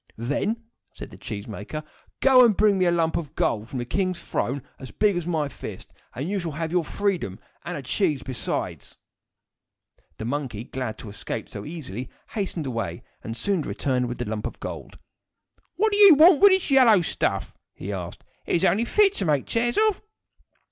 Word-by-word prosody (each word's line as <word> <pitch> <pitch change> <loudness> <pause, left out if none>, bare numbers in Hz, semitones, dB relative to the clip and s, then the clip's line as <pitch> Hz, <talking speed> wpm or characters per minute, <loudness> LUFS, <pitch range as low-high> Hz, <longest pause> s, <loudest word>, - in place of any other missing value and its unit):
"Then," 150 - -1 0.3
said - - -9
the - - -12
cheese 100 -1 -6
maker, 110 +8 -6 0.4
"go 260 -2 +7
and 225 -5 +4
bring 205 -2 +4
me 185 - +3
a 175 - +4
lump 165 -1 +1
of 155 -5 -6
gold 110 +1 0
from 135 - -5
the 120 - -3
king's 185 +6 -1
throne 135 -5 -2 0.2
as 130 - -8
big 205 -2 +2
as 175 -1 -3
my 160 -4 0
fist, - - -9 0.2
and 140 +5 -3
you 200 +1 -1
shall 170 -4 -4
have 160 +1 -3
your 175 -1 +2
freedom 180 - -2 0.2
and - - -4
a - - -7
cheese 140 -3 0
besides." 130 -3 -4 1.2
The 110 - -5
monkey, 125 -4 -3
glad 125 -3 -5
to 110 - -9
escape 100 - -5
so - - -7
easily, 130 - -6 0.2
hastened 195 -7 -3
away, 115 -3 -4 0.2
and 115 +1 -5
soon 195 +1 0
returned 130 -4 -1
with 120 - -5
the 120 - -4
lump 105 0 -3
of - - -10
gold. - - -7 0.8
"What 435 +2 +2
do 410 - +1
you 400 -6 +10
want 320 +3 +7
of 405 - +9
this 375 -5 +2
yellow 240 -8 +6
stuff?" - - -1 0.2
he 100 +2 -5
asked. 90 -3 -6 0.2
"It - - +1
is 175 - +2
only 215 +5 +3
fit 405 - +4
to 195 - -2
make 145 -4 +1
chairs 240 +1 0
of." 425 - -1
165 Hz, 195 wpm, -25 LUFS, 125-210 Hz, 1.2 s, you